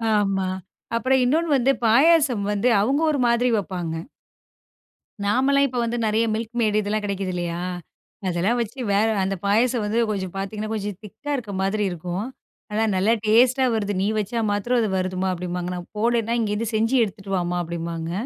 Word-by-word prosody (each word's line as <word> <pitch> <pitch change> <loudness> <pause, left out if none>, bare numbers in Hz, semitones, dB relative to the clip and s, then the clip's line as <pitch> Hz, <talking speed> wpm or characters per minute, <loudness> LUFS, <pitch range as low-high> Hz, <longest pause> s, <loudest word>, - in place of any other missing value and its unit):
ஆமா. 195 -2 +1 0.5
அப்புறம் 260 +3 +2
இன்னொண்ணு 320 +6 +1
வந்து, 265 +1 +3
பாயாசம் 270 -2 +4
வந்து 205 +4 +1
அவவுங்க 270 +8 +1
ஒரு 285 - -1
மாதிரி 240 +1 +2
வப்பாங்க. 180 -5 -3 1.3
நாமெல்லாம் 270 +6 +3
இப்போ 250 -1 -3
வந்து, 235 +1 -2
நெறைய 220 +2 +2
மில்க் 225 +2 -4
மேய்டு, 215 -2 +2
இதெல்லாம் 210 +1 -2
கிடைக்குது 195 -2 -2
இல்லையா, 175 -1 -3 0.7
அதெல்லாம் 185 +7 +1
வச்சு 235 +4 -5
வேற 210 +2 +3 0.2
அந்த 195 +1 -1
பாயாசம் 230 +3 +2
வந்து 220 +3 0
கொஞ்சம் 190 -3 -4
பாத்தீங்கன்னா, 210 +2 -4
கொஞ்சம் 205 -3 -4
திக்கா 290 +8 -7
இருக்க 220 -5 -6
மாதிரி 210 +2 0
இருக்கும். 175 +4 -4 0.5
ஆனா, 215 +1 +1
"நல்லா 195 +5 +3
டேஸ்ட்டா 250 +5 +4
வருது. 205 -2 -1
நீ 195 - +1
வச்சா 215 +3 -2
மாத்திரம் 240 +5 +1
அது 215 - 0
வருதும்மா." 185 0 -1
அப்பிடிம்பாங்க. 180 0 -4
நான் 175 -1 -7
போனேன்னா, 230 +1 +1
"இங்கேருந்து 215 0 -1
செஞ்சு 225 +4 +2
எடுத்துகிட்டு 195 -2 -4
வாம்மா" 175 0 -1
அப்படிம்பாங்க. 165 0 -4
210 Hz, 160 wpm, -23 LUFS, 190-235 Hz, 1.3 s, பாயாசம்